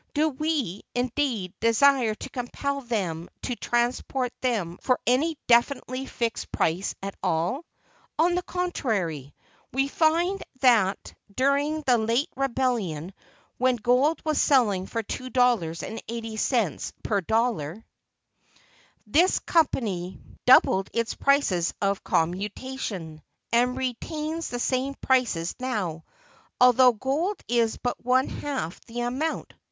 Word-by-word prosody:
Do 310 +2 +3
we, 285 - -2
indeed, 245 -6 -1
desire 230 0 +4
to - - -8
compel 280 +3 -3
them 185 -9 -3
to 245 - -2
transport 245 +2 -1
them 205 -9 -1
for 255 -1 +1
any 290 +6 +2
definitely 255 +2 +2
fixed 235 -1 -3
price 170 +5 0
at 195 0 -4
all? 175 - -1 0.5
On 340 +3 +3
the 360 - +1
contrary, 210 - -2 0.4
we 270 +2 +1
find 335 +6 +1 0.2
that 225 -7 +3 0.2
during 285 +4 +1
the 250 -4 +3
late 230 +9 +1
rebellion, 235 - -1 0.5
when 255 0 +3
gold 250 +7 +2
was 310 -1 +2
selling 210 -9 +3
for 230 -1 -3
two 255 +4 -5
dollars 235 -11 +2
and 225 - -6
eighty 225 -1 -5
cents 220 - 0
per 205 -3 0
dollar, 220 -3 -1 1.2
this 330 - +3
company 205 - 0 0.3
doubled 195 -6 +6
its 230 -1 0
prices 270 -12 +2
of 200 -1 0
commutation, 185 -2 -2 0.3
and 245 +2 +2
retains 305 +6 -3
the 245 - -3
same 260 +2 -1
prices 240 -13 +1
now, 195 -11 -3 0.6
although 250 0 +7
gold 285 - -1
is 235 -2 +1
but 245 - -3
one 255 +2 +3
half 265 - -4
that 235 0 -10
amount 255 +7 -2
($1. - - -22
245 Hz, 125 wpm, -26 LUFS, 205-275 Hz, 1.2 s, although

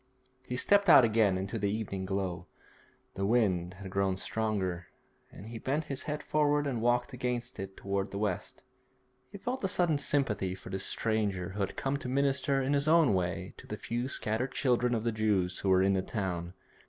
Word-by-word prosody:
He 125 - -3
stepped 200 +8 +3
out 130 -6 +9
again 110 -4 +3
into 95 +4 -3
the 100 0 0
evening 100 -3 -3
glow. 95 -2 -3 0.7
The 95 - -3
wind 95 -5 +1
had 95 0 -9
grown 95 -1 +1
stronger, 95 -5 -2 0.4
and 100 - -11
he 115 -1 -6
bent 140 +7 -1
his 135 - -3
head 150 0 -3
forward 145 -1 +2
and 125 -5 -2
walked 120 +2 +1
against 125 -1 -3
it 95 0 -6
towards 100 0 -2
the 100 - -6
west. 100 -3 -3 0.7
He - - -8
felt 250 +5 -4
a - - +2
sudden 175 -5 +2
sympathy 105 -11 0
for 95 - -10
this 95 0 -2
stranger 105 -5 0
who 100 +2 -7
had 100 - -2
come 135 +1 -1
to 130 - -6
minister 135 0 +1
in 135 +2 +1
his 140 +1 +1
own 160 -7 +5
way 90 -2 -2
to - - -13
the - - -5
few 120 +2 -3
scattered 125 0 -2
children 125 -3 +2
of 110 - -2
the 115 - +1
Jews 105 -5 0
who 100 - -1
were 95 0 +5
in 100 0 +3
the 95 - +1
town. 90 -4 -3
110 Hz, 200 wpm, -31 LUFS, 95-135 Hz, 0.7 s, out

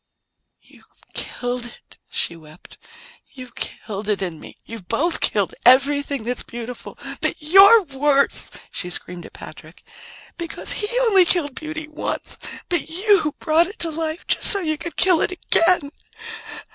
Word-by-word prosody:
"You've - - -20 0.3
killed 245 0 -4
it," 240 - -16
she 170 - -2
wept. 155 0 -16 0.5
"You've 255 -3 -11
killed 210 -1 -5
it 200 -2 0
in 170 -4 -5
me. - - -12
You've 225 -6 -10
both 315 +9 0
killed 200 -3 +1
everything 280 +1 +4
that's 245 +2 -1
beautiful. 240 +1 -8 0.2
But - - 0
you're 390 +8 +7
worse," 280 -2 0 0.2
she 180 - -3
screamed 175 0 -3
at - - -19
Patrick, - - -12 0.6
"because 335 -1 -4
he 415 - -1
only 410 -6 +6
killed 330 -5 +1
beauty 310 +2 -6
once, 305 0 -5 0.3
but 345 -2 -2
you 360 -3 +2
brought 325 +1 +3
it 400 - -9
to 330 - -1
life 315 +1 -3
just - - 0
so 400 - +6
you 310 -4 -1
could 340 0 -5
kill 360 -3 +4
it - - +1
again. 335 -4 +2
295 Hz, 150 wpm, -21 LUFS, 240-340 Hz, 0.6 s, you're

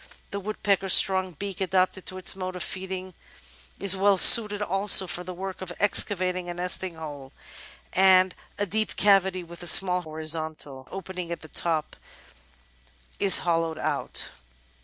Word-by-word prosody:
The 200 - -5
woodpecker's 200 -2 0
strong 190 -1 +3
beak, 195 +3 -8
adapted 185 0 -1
to 185 - -7
its 185 +1 +1
mode 185 -1 -7
of 180 - -4
feeding, 185 0 -7 0.7
is 200 -2 +4
weU 195 0 +1
suited 210 -1 +7
also 195 -1 +3
for 180 0 -6
the 185 - -8
work 190 +1 -8
of 185 -2 -7
excavating 185 -3 +1
a 175 - -6
nesting 180 0 -3
hole, 145 -4 -10 0.6
and 185 -1 +3 0.2
a 205 - -2
deep 215 +3 -3
cavity 190 -2 +1
with 170 +1 -14
a 175 - -3
small 180 0 +6
horizontal 155 -4 -4
opening 185 -2 -8
at 170 - -6
the 160 - -14
top 160 -2 -2 1.2
is 195 -2 +7
hollowed 165 -2 -1
out. - - -3
185 Hz, 150 wpm, -24 LUFS, 170-195 Hz, 1.2 s, suited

